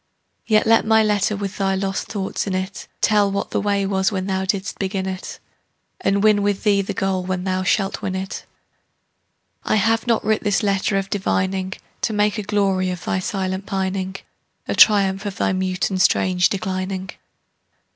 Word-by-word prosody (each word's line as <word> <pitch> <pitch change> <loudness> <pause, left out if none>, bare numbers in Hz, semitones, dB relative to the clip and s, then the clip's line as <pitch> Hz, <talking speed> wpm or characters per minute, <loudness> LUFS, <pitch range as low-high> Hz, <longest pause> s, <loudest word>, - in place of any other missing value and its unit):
Yet 215 -1 +4
let 225 0 +5
my 220 0 +4
letter 210 -1 +1
with 200 0 -5
thy 195 -1 +1
lost 195 0 -2
thoughts 200 -1 -3
in 190 - -1
it 185 +1 -4
Tell 205 -2 +3
what 200 - -3
the - - 0
way 200 -1 +1
was 190 +1 +1
when 190 -2 -2
thou 190 -1 -1
didst 190 0 -2
begin 190 -1 -2
it, 190 0 -5 0.6
And 200 +1 +1
win 210 -1 +5
with 200 -1 0
thee 205 -2 +3
the 195 - -5
goal 190 -1 0
when 180 0 -3
thou 185 0 -1
shalt 195 +1 0
win 190 -2 -3
it. 190 0 -5 1.2
I - - +1
have 225 +2 +2
not 230 -2 +1
writ 220 0 +1
this 205 +2 +1
letter 195 0 +1
of 195 0 -3
divining 190 -1 -1 0.3
To 220 - 0
make 210 +1 +1
a - - -1
glory 195 -2 +1
of 180 -1 -5
thy 190 - 0
silent 190 0 -3
pining, 190 0 -2 0.5
A - - -1
triumph 200 -1 +4
of 195 - -5
thy - - +1
mute 185 0 -1
and 185 -1 0
strange 180 0 +3
declining. 190 -1 -3
195 Hz, 185 wpm, -21 LUFS, 190-205 Hz, 1.2 s, let